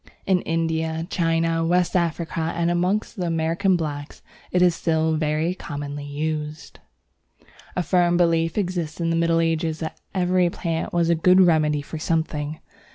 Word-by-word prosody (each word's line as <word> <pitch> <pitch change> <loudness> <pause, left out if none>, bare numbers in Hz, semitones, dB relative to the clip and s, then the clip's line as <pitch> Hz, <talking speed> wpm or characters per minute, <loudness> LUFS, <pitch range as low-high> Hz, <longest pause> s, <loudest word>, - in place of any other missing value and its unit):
In 185 -2 +2
India, 160 0 -1
China, 165 -1 +1
West 175 +2 +1
Africa, 170 -1 -1 0.2
and 170 0 +1
amongst 180 +6 0
the 180 -2 -1
American 165 +4 +1
blacks, 145 -3 -5 0.3
it 180 0 +2
is 175 -1 +5
still 160 -1 +1
very 155 +2 0
commonly 145 -4 -6
used. 150 0 -4 1.0
A 180 - 0
firm 175 +1 +2
belief 165 -1 +2
existed 175 -4 -2
in 165 - +1
the - - +1
Middle 165 0 +2
Ages 165 -1 0
that 160 -1 -6 0.2
every 180 -1 +2
plant 165 -1 -3
was 170 -1 +2
a - - +5
good 180 +3 +5
remedy 155 -4 +3
for 155 +2 -7
something. 155 -2 -2
165 Hz, 155 wpm, -23 LUFS, 160-175 Hz, 1.0 s, is